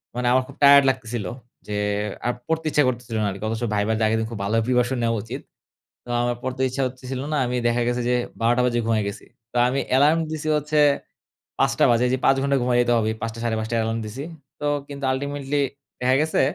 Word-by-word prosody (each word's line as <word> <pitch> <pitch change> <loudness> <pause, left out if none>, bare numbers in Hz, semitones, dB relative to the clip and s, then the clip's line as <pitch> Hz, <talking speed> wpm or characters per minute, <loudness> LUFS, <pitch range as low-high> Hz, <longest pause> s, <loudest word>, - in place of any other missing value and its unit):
মানে 125 0 -1
আমার 130 +1 +4
খুব - - -12
টায়ারড 140 0 +9
লাগতেছিল। 120 -5 -3 0.4
যে 105 - -3 0.5
আর 120 - +1
পড়তে 160 0 -1
ইচ্ছা 150 -1 +3
করতেছিল 120 -2 -3
না - - +1
আরকি। 100 +2 -8
অথচ 110 +1 -3
ভাইভাতে 110 +2 0
আগের 110 +1 +2
দিন 110 - -2
খুব 110 - -6
ভালো 100 +3 0
প্রিপারেশন 125 +1 +1
নেওয়া 115 0 +1
উচিত। 125 +5 -6 0.6
তো 120 - -10
আমার 120 0 0
পড়তে 130 0 -4
ইচ্ছা 130 +2 -2
করতেছিল 130 0 -5
না - - +1
আমি 125 +1 -2
দেখা 120 +1 +2
গেছে 120 0 0
যে 125 - +2 0.3
১২ঃ০০ 120 +2 +3
বাজে 120 -1 +1
ঘুমায়ে 110 -2 +1
গেছি। 100 - -8 0.3
তো 125 - -6
আমি 135 +2 0 0.2
এলার্ম 150 +4 +5
দিছি 155 0 -4
হচ্ছে 150 +1 0 0.8
৫ঃ০০ - - +3
বাজে 120 +1 +3
যে - - +3
৫ 135 - +5
ঘন্টা 140 0 +2
ঘুমায় 120 0 +2
যেতে 120 0 +1
হবে। 110 -1 +1
৫ঃ০০ 115 0 -4
৫:৩০ 110 0 -1
য় - - +2
অ্যালার্ম 115 +1 -1
দিছি। 120 +6 -6 0.4
তো 150 - -2 0.2
কিন্তু 140 -1 -7
আল্টিমেটলি 140 +1 -2 0.4
দেখা 125 +1 +3
গেছে 160 +1 +1
125 Hz, 210 wpm, -23 LUFS, 115-135 Hz, 0.8 s, টায়ারড